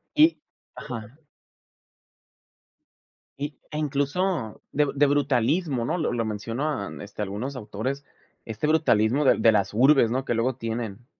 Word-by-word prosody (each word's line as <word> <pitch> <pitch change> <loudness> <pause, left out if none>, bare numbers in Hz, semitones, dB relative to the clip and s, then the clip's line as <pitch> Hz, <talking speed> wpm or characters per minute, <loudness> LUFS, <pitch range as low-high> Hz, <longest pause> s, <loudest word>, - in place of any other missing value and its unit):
Y 315 +2 +5 0.4
ajá. 115 +1 -8 2.2
Y, 145 -1 -5
e 150 - -4
incluso 145 - -1
de 150 +1 +2
de 145 +1 +4
brutalismo, 145 -1 +1
¿no?, 170 - -1
lo 155 - -1
lo 115 -2 -1
mencionan, 115 +3 -3
este, 105 +1 -8
algunos 105 +8 -4
autores, 125 +4 -4 0.4
este 110 +7 -3
brutalismo 140 -4 +3
de - - +5
de 115 - +5
las 105 -2 +1
urbes 130 0 +5
¿no?, 130 +2 0
que - - 0
luego 125 +3 0
tienen. 115 -2 -5
130 Hz, 135 wpm, -25 LUFS, 110-145 Hz, 2.2 s, Y